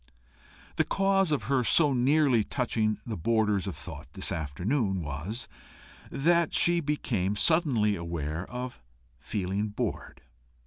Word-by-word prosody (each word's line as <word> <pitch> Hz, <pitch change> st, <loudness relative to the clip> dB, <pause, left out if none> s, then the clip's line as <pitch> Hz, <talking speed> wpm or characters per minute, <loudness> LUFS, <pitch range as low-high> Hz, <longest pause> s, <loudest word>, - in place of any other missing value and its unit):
The -, -, +4 dB
cause 195 Hz, -3 st, +2 dB
of 145 Hz, -8 st, 0 dB
her 130 Hz, +3 st, +1 dB
so 145 Hz, +4 st, +4 dB
nearly 130 Hz, -2 st, +3 dB
touching 110 Hz, -3 st, 0 dB
the 115 Hz, -, -4 dB
borders 105 Hz, +1 st, +1 dB
of 95 Hz, -, -4 dB
thought -, -, -9 dB
this -, -, -4 dB
afternoon, 95 Hz, -, -1 dB
was, 80 Hz, -, -4 dB, 0.6 s
that 170 Hz, +3 st, +2 dB
she 175 Hz, 0 st, +4 dB
became 120 Hz, -, -1 dB
suddenly 115 Hz, -, +2 dB
aware 85 Hz, -1 st, -4 dB
of 125 Hz, -, -6 dB, 0.4 s
feeling 100 Hz, +4 st, -2 dB
bored. 105 Hz, -, -4 dB
110 Hz, 125 wpm, -28 LUFS, 95-140 Hz, 0.6 s, The